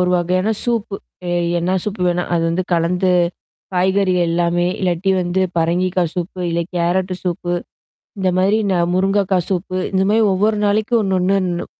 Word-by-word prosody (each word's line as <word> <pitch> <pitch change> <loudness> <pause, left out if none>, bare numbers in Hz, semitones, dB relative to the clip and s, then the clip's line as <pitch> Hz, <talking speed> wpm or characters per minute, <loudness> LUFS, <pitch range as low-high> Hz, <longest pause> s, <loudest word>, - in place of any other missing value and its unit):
ஒரு 180 0 +2
வகையான 185 +4 0
சூப்பு. 230 -4 -1 0.3
எ - - 0 0.3
என்ன 180 +2 0
சூப்பு 210 -3 -3
வேணா 175 0 0
அது 170 - +1
வந்து 175 +3 0
கலந்து, 180 +2 +1 0.6
காய்கறிகள் 185 -1 +2
எல்லாமே, 175 +1 +1
இல்லாட்டி 185 0 0
வந்து 175 +2 -1 0.2
பரங்கிக்காய் 175 +1 0
சூப்பு, 180 +1 -4
இல்ல 170 0 0 0.2
கேரட் 180 +2 0
சூப்பு. 175 0 -2 0.7
இந்த 190 -1 +1
மாரி 195 +4 +3
ந - - +2 0.2
முருங்கக்காய் 190 -1 +1
சூப்பு, 185 0 -2 0.2
இந்த 190 0 +2
மாரி 220 +1 +3
ஒவ்வொரு 210 +3 +1
நாளைக்கும் 215 +3 +2
ஒண்ணு, 190 -1 +1 0.2
ஒண்ணு 175 -2 -2
185 Hz, 155 wpm, -18 LUFS, 175-195 Hz, 0.7 s, மாரி